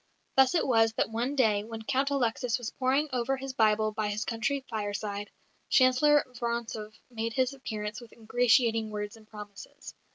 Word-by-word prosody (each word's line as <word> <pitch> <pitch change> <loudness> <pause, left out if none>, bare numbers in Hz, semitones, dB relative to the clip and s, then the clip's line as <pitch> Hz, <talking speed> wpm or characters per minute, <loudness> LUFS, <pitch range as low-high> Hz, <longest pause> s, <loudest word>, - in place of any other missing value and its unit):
Thus 265 +4 +5
it 335 - +2
was 225 -3 +3
that 225 - -1
one 240 +5 -2
day, 215 -6 +3
when 225 0 -8
Count 270 +5 0
Alexis 245 -3 0
was 240 -3 -5
poring 270 +3 +1
over 255 +2 0
his 270 0 -6
Bible 215 -2 +2
by 215 0 -2
his 210 +1 -2
country 265 +4 -2
fireside, 205 -1 -4 0.4
Chancellor 270 +3 +5
Vorontsov 235 -3 -4 0.2
made 230 -1 -3
his 260 +1 +1
appearance 215 -4 -5
with 235 - -13
ingratiating 225 -1 +2
words 210 0 -5
and 220 -1 -18
promises. 205 -2 -10
230 Hz, 165 wpm, -29 LUFS, 215-255 Hz, 0.4 s, Thus